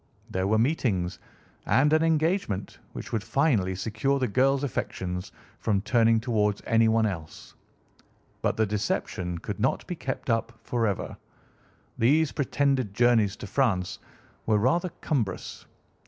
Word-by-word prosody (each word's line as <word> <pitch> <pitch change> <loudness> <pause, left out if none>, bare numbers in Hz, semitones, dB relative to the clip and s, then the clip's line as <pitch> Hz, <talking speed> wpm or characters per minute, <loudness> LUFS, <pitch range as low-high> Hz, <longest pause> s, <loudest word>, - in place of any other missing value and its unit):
There 95 +1 0
were 110 +2 +3
meetings, 110 - 0 0.5
and 145 +3 +4
an 155 - +4
engagement, 160 - 0
which - - -8
would 110 -3 0
finally 110 -7 +1
secure 110 +8 0
the 130 -2 0
girl's 135 +5 +2
affections 90 -8 -3 0.3
from 100 -3 +1
turning 115 +1 +3
towards 105 -3 0
anyone 115 0 +3
else. 85 -7 -6 0.9
But - - 0
the 110 - +3
deception 100 -4 -2
could - - -6
not - - 0
be - - -4
kept - - -5
up 115 +1 -1
forever. 115 -5 -1 0.8
These 145 +7 +3
pretended 135 -6 0
journeys 115 -3 +3
to - - -8
France 100 -6 0 0.5
were 110 -1 +4
rather 170 - +2
cumbrous. 115 - -3
115 Hz, 130 wpm, -27 LUFS, 100-135 Hz, 0.9 s, and